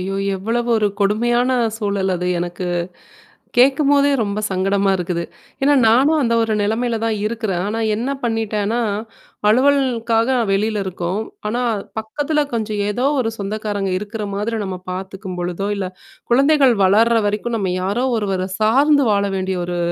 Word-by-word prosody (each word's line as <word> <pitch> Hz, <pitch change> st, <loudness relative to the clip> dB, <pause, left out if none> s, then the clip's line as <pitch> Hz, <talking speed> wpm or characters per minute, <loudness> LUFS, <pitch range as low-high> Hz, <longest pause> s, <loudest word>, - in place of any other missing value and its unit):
ஐயோ! 195 Hz, +1 st, -3 dB, 0.2 s
எவ்வளவு 230 Hz, +5 st, -2 dB
ஒரு 210 Hz, -1 st, +2 dB
கொடுமையான 240 Hz, +5 st, +2 dB, 0.3 s
சூழல் 200 Hz, -3 st, -1 dB
அது 180 Hz, +1 st, -3 dB
எனக்கு. 175 Hz, +1 st, -4 dB, 0.9 s
கேட்கும்போதே 280 Hz, +2 st, +4 dB
ரொம்ப 205 Hz, -1 st, -1 dB
சங்கடமா 195 Hz, +1 st, +1 dB
இருக்குது. 175 Hz, -1 st, -2 dB, 0.4 s
ஏன்னா 290 Hz, +1 st, +4 dB
நானும் 270 Hz, +8 st, +4 dB
அந்த 235 Hz, -2 st, +1 dB
ஒரு 225 Hz, -1 st, -1 dB
நிலைமையில 225 Hz, +3 st, 0 dB
தான் 225 Hz, -1 st, 0 dB
இருக்குறேன். 215 Hz, -5 st, -2 dB
ஆனா 215 Hz, +2 st, -2 dB, 0.2 s
என்ன 230 Hz, +5 st, -2 dB, 0.2 s
பண்ணிட்டேன்னா, 225 Hz, -1 st, -1 dB, 0.7 s
அலுவலகத்துக்காக 245 Hz, -2 st, +2 dB, 0.2 s
வெளில 210 Hz, +1 st, 0 dB
இருக்கோம். 185 Hz, +1 st, -3 dB, 0.3 s
ஆனா 235 Hz, +3 st, -1 dB, 0.4 s
பக்கத்துல 290 Hz, +7 st, -1 dB
கொஞ்சம் 215 Hz, -3 st, -2 dB
ஏதோ 245 Hz, +5 st, -1 dB, 0.2 s
ஒரு 225 Hz, -3 st, 0 dB
சொந்தக்காரங்க 205 Hz, -1 st, -3 dB
இருக்கிற 210 Hz, +2 st, -5 dB
மாதிரி 220 Hz, +3 st, -2 dB
நம்ம 190 Hz, -2 st, -4 dB
பார்த்துக்கும்பொழுதோ, 185 Hz, 0 st, -4 dB
இல்ல 190 Hz, -2 st, -3 dB, 0.4 s
குழந்தைகள் 275 Hz, 0 st, +4 dB
வளர்ற 225 Hz, +5 st, +4 dB
வரைக்கும் 220 Hz, +3 st, -2 dB
நம்ம 190 Hz, -3 st, -1 dB
யாரோ 205 Hz, +7 st, 0 dB
ஒருவர 190 Hz, -3 st, -2 dB
சார்ந்து 275 Hz, +6 st, +4 dB
வாழ 200 Hz, 0 st, +2 dB
வேண்டிய 190 Hz, -1 st, -2 dB
ஒரு 175 Hz, 0 st, -3 dB
215 Hz, 135 wpm, -19 LUFS, 195-240 Hz, 0.9 s, கேட்கும்போதே